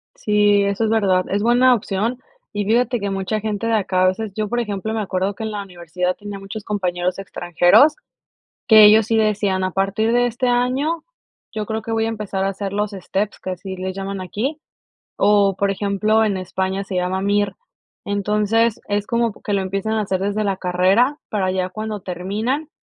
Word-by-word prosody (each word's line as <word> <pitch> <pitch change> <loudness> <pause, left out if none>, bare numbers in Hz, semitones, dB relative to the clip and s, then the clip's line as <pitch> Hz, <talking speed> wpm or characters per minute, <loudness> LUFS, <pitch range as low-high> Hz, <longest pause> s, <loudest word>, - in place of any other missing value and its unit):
Sí, 205 -1 +3
eso 200 +3 0
es - - 0
verdad, 195 -5 +2
es 200 +1 -1
buena 245 +2 +5
opción 225 +4 -2 0.3
y 205 - -1
fíjate 240 +3 +1
que 200 - -1
mucha 195 +2 -2
gente 215 +1 -2
de 230 - +1
acá 190 -3 +1
a - - +5
veces, 200 +3 -1
yo 215 0 -2
por 240 +3 -1
ejemplo, 210 0 -3
me 220 - -1
acuerdo 190 0 -2
que 225 - -6
en 220 - -3
la 205 -1 -4
universidad 180 -1 -3
tenía 205 -1 -8
muchos 195 +2 -7
compañeros 180 -3 -2
extranjeros 175 - +3 0.7
que 215 -3 +9
ellos 215 +1 +6
sí 225 - +2
decían: 205 -3 +1
"A 185 - -1
partir 200 +4 0
de 245 0 +3
este 245 +2 -2
año 260 +7 0 0.5
yo 215 -1 -4
creo 220 +1 -3
que 225 - -6
voy 225 0 +1
a 225 - -1
empezar 205 -3 -3
a 195 - +1
hacer 195 0 -5
los 210 0 -1
steps," 200 +1 -3
que 185 - -6
así 190 +1 -6
le 185 0 -4
llaman 195 0 -5
aquí, 255 - -3 0.6
o 200 -1 +4
por 200 +1 +1
ejemplo, 210 +2 +1
en 200 -3 0
España 190 +1 -2
se 195 -1 -6
llama 180 +1 -1
MIR. 205 0 +1 0.5
Entonces, 210 +3 +1
es 205 0 -1
como 235 -2 0
que 205 - -3
lo 195 - +1
empiezan 195 +3 -2
a 220 - +1
hacer 190 -2 -1
desde 205 +2 -1
la 195 -2 -1
carrera 190 +10 +2
para 195 -3 0
ya 185 0 -1
cuando 215 +1 -5
terminan, 210 - -3
205 Hz, 200 wpm, -20 LUFS, 190-220 Hz, 0.7 s, que